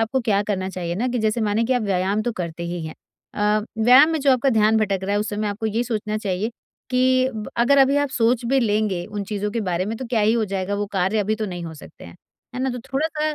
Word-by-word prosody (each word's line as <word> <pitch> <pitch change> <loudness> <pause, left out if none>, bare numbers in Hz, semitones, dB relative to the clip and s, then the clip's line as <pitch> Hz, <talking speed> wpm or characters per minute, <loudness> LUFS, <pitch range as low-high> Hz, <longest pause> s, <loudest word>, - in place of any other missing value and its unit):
आपको 225 +4 0
क्या 205 -4 +1
करना 190 -2 -2
चाहिए 175 -2 -4
ना 235 +8 -1
कि 250 0 -1
जैसे 220 +1 0
मानिए 215 +1 +1
कि 255 - +1
आप 245 - +1
व्यायाम 195 +1 0
तो 240 - -2
करते 170 -4 -5
ही 170 -1 -4
हैं। 155 - -8 0.4
अ, 210 0 +1 0.2
व्यायाम 265 +6 +7
में 320 - -1
जो 275 -1 +4
आपका 255 +2 +2
ध्यान 220 -1 +3
भटक 205 -3 +1
रहा 200 +1 -2
है, - - +2
उस 210 - -3
समय 210 0 -2
आपको 210 +2 -3
ये 220 +2 0
सोचना 215 -2 -2
चाहिए 205 +1 -2 0.4
कि 255 0 +3
ब 215 -1 -5
अगर 275 +4 +4
अभी 275 +1 +5
आप 285 0 +1
सोच 240 -2 +1
भी 270 +3 +2
लेंगे 210 -5 0
उन 205 -1 -5
चीज़ों 210 0 -3
के 230 +2 -2
बारे 180 -2 -1
में। 225 - -3
तो 260 - -5
क्या 230 -2 0
ही 210 +1 +3
हो 230 -1 +1
जाएगा, 195 0 -3
वो 205 0 -2
कार्य 190 +2 +1
अभी 210 +1 +1
तो 215 - -3
नहीं 175 -3 -6
हो 160 -1 -7
सकते 150 - -13
हैं। - - -12 0.4
है 250 - -4
ना? 265 - 0
तो 250 - -5
थोड़ा-सा 305 +4 -2
215 Hz, 270 wpm, -22 LUFS, 200-245 Hz, 0.4 s, व्यायाम